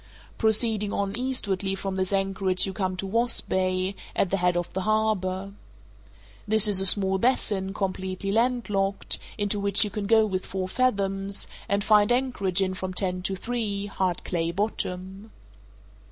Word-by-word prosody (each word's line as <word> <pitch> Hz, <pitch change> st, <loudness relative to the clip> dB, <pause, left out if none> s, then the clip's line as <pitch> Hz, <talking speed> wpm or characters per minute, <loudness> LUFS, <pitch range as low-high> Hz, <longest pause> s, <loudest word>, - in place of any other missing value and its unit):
Proceeding 220 Hz, -2 st, +2 dB
on 200 Hz, -1 st, -2 dB
eastwardly 205 Hz, -6 st, -2 dB
from 195 Hz, 0 st, -5 dB
this 185 Hz, 0 st, -2 dB
anchorage 195 Hz, -1 st, +2 dB
you 195 Hz, -, -4 dB
come 185 Hz, -2 st, -3 dB
to 195 Hz, -, -4 dB
Wasp 230 Hz, +4 st, +2 dB
Bay, 185 Hz, 0 st, 0 dB, 0.2 s
at 190 Hz, -, 0 dB
the 195 Hz, -, +1 dB
head 180 Hz, -1 st, +1 dB
of 175 Hz, 0 st, -4 dB
the 190 Hz, -, -2 dB
harbour. 200 Hz, -2 st, -1 dB, 0.9 s
This 215 Hz, 0 st, +3 dB
is 195 Hz, -2 st, +6 dB
a 195 Hz, -, +6 dB
small 190 Hz, 0 st, +5 dB
basin, 205 Hz, -5 st, 0 dB
completely 190 Hz, 0 st, -3 dB
landlocked, 210 Hz, -4 st, -1 dB, 0.2 s
into 205 Hz, 0 st, 0 dB
which 200 Hz, -1 st, +6 dB
you 210 Hz, -, -3 dB
can 200 Hz, 0 st, -4 dB
go 220 Hz, 0 st, +4 dB
with 190 Hz, -3 st, -3 dB
four 185 Hz, -1 st, -4 dB
fathoms, 195 Hz, -4 st, -1 dB, 0.2 s
and 200 Hz, 0 st, +1 dB
find 210 Hz, +1 st, +4 dB
anchorage 205 Hz, -7 st, +1 dB
in 185 Hz, 0 st, -2 dB
from 185 Hz, 0 st, -6 dB
ten 185 Hz, -2 st, +1 dB
to 190 Hz, +1 st, -2 dB
three, 210 Hz, -1 st, -3 dB
hard 185 Hz, -3 st, -2 dB
clay 165 Hz, -2 st, -2 dB
bottom. 190 Hz, +1 st, -4 dB
195 Hz, 160 wpm, -25 LUFS, 185-210 Hz, 0.9 s, is